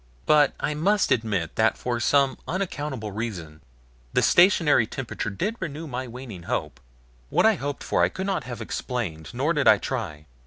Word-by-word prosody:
But 150 Hz, -2 st, +5 dB
I 150 Hz, -, -1 dB
must 195 Hz, +7 st, +1 dB
admit 100 Hz, -8 st, 0 dB
that 110 Hz, 0 st, +3 dB
for 120 Hz, -1 st, -2 dB
some 140 Hz, +2 st, +2 dB
unaccountable 150 Hz, -, -3 dB
reason 90 Hz, -8 st, -5 dB, 0.5 s
the -, -, +3 dB
stationary 165 Hz, -, +5 dB
temperature 120 Hz, -4 st, -4 dB
did 205 Hz, -, -3 dB
renew 165 Hz, -2 st, -5 dB
my 130 Hz, -3 st, -4 dB
waning 120 Hz, -6 st, -9 dB
hope. -, -, -2 dB, 0.5 s
What -, -, +3 dB
I 220 Hz, -, +6 dB
hoped 145 Hz, -6 st, -4 dB
for -, -, +1 dB
I -, -, +4 dB
could 190 Hz, -, -5 dB
not 195 Hz, -1 st, -1 dB
have 120 Hz, -2 st, -6 dB
explained, 100 Hz, -, -4 dB
nor 140 Hz, +7 st, 0 dB
did 145 Hz, -5 st, +1 dB
I 110 Hz, -1 st, +8 dB
try. 95 Hz, -, -4 dB
130 Hz, 170 wpm, -25 LUFS, 110-150 Hz, 0.5 s, I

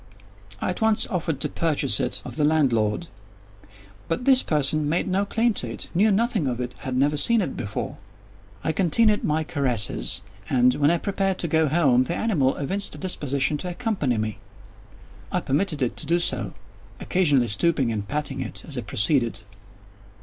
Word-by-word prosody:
I -, -, -1 dB
at 180 Hz, -, -4 dB
once 220 Hz, -1 st, +4 dB
offered 165 Hz, -5 st, -2 dB
to -, -, +2 dB
purchase 160 Hz, -3 st, +1 dB
it -, -, -1 dB
of -, -, -7 dB
the 155 Hz, -, 0 dB
landlord; 135 Hz, -4 st, +1 dB, 1.0 s
but 165 Hz, +9 st, -2 dB
this 265 Hz, -1 st, +6 dB
person 150 Hz, 0 st, +1 dB
made 170 Hz, +5 st, 0 dB
no 195 Hz, +2 st, 0 dB
claim 230 Hz, +2 st, +1 dB
to 125 Hz, -, -4 dB
it—knew 180 Hz, -, 0 dB
nothing 210 Hz, -, +1 dB
of 125 Hz, -1 st, -2 dB
it—had 125 Hz, +1 st, -4 dB
never 145 Hz, +3 st, +2 dB
seen 235 Hz, +10 st, +4 dB
it 190 Hz, -, -2 dB
before. 100 Hz, +1 st, -5 dB, 0.6 s
I 160 Hz, -, +1 dB
continued 205 Hz, +5 st, +3 dB
my 155 Hz, +1 st, +1 dB
caresses, 115 Hz, -, 0 dB, 0.3 s
and, 125 Hz, -1 st, +4 dB
when 145 Hz, +2 st, +2 dB
I 170 Hz, -, +3 dB
prepared 195 Hz, +1 st, -1 dB
to 170 Hz, -, -2 dB
go 160 Hz, 0 st, +2 dB
home, 135 Hz, -5 st, +3 dB
the 170 Hz, -, -2 dB
animal 155 Hz, -13 st, +1 dB
evinced 195 Hz, +8 st, -3 dB
a -, -, -9 dB
disposition 145 Hz, -5 st, -1 dB
to 180 Hz, -, -5 dB
accompany 175 Hz, -, -1 dB
me. 110 Hz, -1 st, -3 dB, 0.9 s
I 180 Hz, -, +1 dB
permitted 150 Hz, -1 st, 0 dB
it 125 Hz, -, -2 dB
to 155 Hz, -, -3 dB
do 170 Hz, +2 st, +3 dB
so; 175 Hz, -, 0 dB, 0.4 s
occasionally 145 Hz, -10 st, +2 dB
stooping 130 Hz, +3 st, +2 dB
and 105 Hz, -2 st, -4 dB
patting 145 Hz, 0 st, -3 dB
it -, -, -7 dB
as 140 Hz, -5 st, -5 dB
I -, -, -3 dB
proceeded. 115 Hz, +1 st, +1 dB
150 Hz, 170 wpm, -24 LUFS, 130-185 Hz, 1.0 s, this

